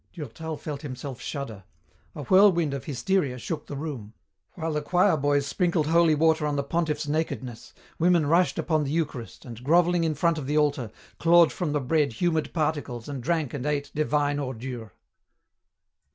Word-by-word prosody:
Durtal 160 Hz, 0 st, -6 dB
felt 145 Hz, -2 st, -6 dB
himself 130 Hz, -2 st, -7 dB
shudder. 115 Hz, -9 st, -6 dB, 0.5 s
A 145 Hz, -, -6 dB
whirlwind 175 Hz, -2 st, +4 dB
of 135 Hz, -3 st, -5 dB
hysteria 145 Hz, -1 st, 0 dB
shook 150 Hz, +4 st, -5 dB
the 145 Hz, -, -6 dB
room. 130 Hz, -8 st, -6 dB, 0.4 s
While 165 Hz, -2 st, -3 dB
the 150 Hz, -, -1 dB
choir 180 Hz, +4 st, +3 dB
boys 145 Hz, -1 st, +1 dB
sprinkled 170 Hz, 0 st, 0 dB
holy 165 Hz, 0 st, +4 dB
water 160 Hz, 0 st, +2 dB
on 145 Hz, -, -1 dB
the 140 Hz, -, 0 dB
pontiff's 155 Hz, 0 st, -1 dB
nakedness, 140 Hz, -6 st, -3 dB, 0.3 s
women 170 Hz, -2 st, +4 dB
rushed 170 Hz, +5 st, +2 dB
upon 155 Hz, -2 st, +1 dB
the 140 Hz, -, -3 dB
Eucharist 145 Hz, -7 st, -3 dB
and, 120 Hz, 0 st, -9 dB
grovelling 175 Hz, +3 st, +3 dB
in 160 Hz, -2 st, 0 dB
front 165 Hz, +1 st, +1 dB
of 135 Hz, -, -6 dB
the 150 Hz, +2 st, 0 dB
altar, 145 Hz, -6 st, +1 dB, 0.3 s
clawed 170 Hz, 0 st, +6 dB
from 165 Hz, -5 st, -2 dB
the 150 Hz, -, +1 dB
bread 140 Hz, 0 st, +1 dB
humid 160 Hz, +3 st, 0 dB
particles 145 Hz, -7 st, -2 dB
and 140 Hz, -3 st, -5 dB
drank 160 Hz, -1 st, -1 dB
and 140 Hz, -4 st, -4 dB
ate 145 Hz, -1 st, -1 dB
divine 145 Hz, -1 st, 0 dB
ordure. 125 Hz, -5 st, -6 dB
150 Hz, 170 wpm, -26 LUFS, 140-165 Hz, 0.5 s, clawed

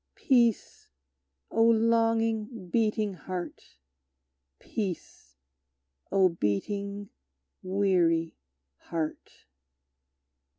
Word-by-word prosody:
Peace, 235 Hz, -5 st, +1 dB, 0.6 s
O 225 Hz, -, +1 dB
longing, 225 Hz, -2 st, +2 dB
beating 215 Hz, -1 st, +1 dB
heart! 180 Hz, -, -7 dB, 0.8 s
Peace, 180 Hz, -, -6 dB, 0.8 s
O 190 Hz, -1 st, +5 dB
beating, 200 Hz, -, -2 dB, 0.5 s
weary 180 Hz, -4 st, +1 dB, 0.4 s
heart! 160 Hz, -2 st, -5 dB
200 Hz, 55 wpm, -28 LUFS, 175-225 Hz, 0.8 s, O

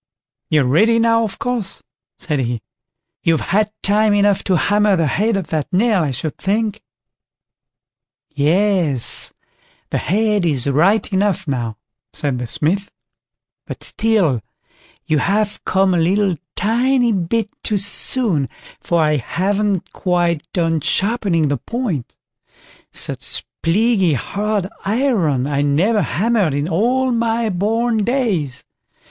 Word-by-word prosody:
"You're 155 Hz, -2 st, +3 dB
ready 215 Hz, -, +3 dB
now, 230 Hz, 0 st, +3 dB
of 215 Hz, -, -4 dB
course", 240 Hz, -6 st, -3 dB, 0.3 s
said 150 Hz, -3 st, -2 dB
he; 120 Hz, -3 st, -2 dB, 0.6 s
"you've 165 Hz, -2 st, +1 dB
had 210 Hz, +1 st, +2 dB
time 210 Hz, +1 st, +3 dB
enough 200 Hz, -1 st, +2 dB
to 185 Hz, -2 st, +2 dB
hammer 205 Hz, +2 st, +2 dB
the 165 Hz, -2 st, +1 dB
head 205 Hz, +8 st, +1 dB
of 190 Hz, -, -5 dB
that 155 Hz, +1 st, -2 dB
nail, 205 Hz, +1 st, +2 dB
I 155 Hz, -, 0 dB
should 135 Hz, +4 st, -4 dB
think." 210 Hz, +1 st, -1 dB, 1.5 s
"Yes, 155 Hz, -, +1 dB, 0.6 s
the -, -, 0 dB
head 210 Hz, +2 st, +1 dB
is 145 Hz, -7 st, 0 dB
right 175 Hz, +10 st, +3 dB
enough 195 Hz, -3 st, 0 dB
now", 120 Hz, -5 st, -3 dB, 0.4 s
said 140 Hz, -4 st, -1 dB
the 125 Hz, -, -4 dB
Smith; 190 Hz, -, -1 dB, 0.8 s
"but -, -, -7 dB
still 195 Hz, -, +1 dB, 0.6 s
you 155 Hz, -1 st, +1 dB
have 210 Hz, +3 st, 0 dB
come 190 Hz, 0 st, +2 dB
a 175 Hz, -, +2 dB
little 190 Hz, +2 st, +2 dB, 0.2 s
tiny 240 Hz, +3 st, +2 dB
bit 205 Hz, +3 st, -1 dB
too 210 Hz, -, 0 dB
soon, 200 Hz, -, +2 dB, 0.3 s
for 170 Hz, -2 st, +1 dB
I 150 Hz, -1 st, +2 dB
haven't 195 Hz, -, -1 dB
quite 175 Hz, -3 st, -1 dB
done 165 Hz, -3 st, 0 dB
sharpening 195 Hz, -, +1 dB
the 145 Hz, 0 st, 0 dB
point; 195 Hz, -, -4 dB, 0.8 s
such -, -, -1 dB, 0.2 s
plaguey 195 Hz, 0 st, +2 dB
hard 205 Hz, -, -2 dB, 0.2 s
iron 200 Hz, -, +1 dB
I 140 Hz, 0 st, -1 dB
never 175 Hz, +10 st, +2 dB
hammered 200 Hz, -4 st, +1 dB
in 145 Hz, +2 st, -1 dB
all 245 Hz, +9 st, +1 dB
my 230 Hz, -1 st, 0 dB
born 225 Hz, +5 st, 0 dB
days. 205 Hz, -, -1 dB
195 Hz, 130 wpm, -18 LUFS, 155-215 Hz, 1.5 s, You're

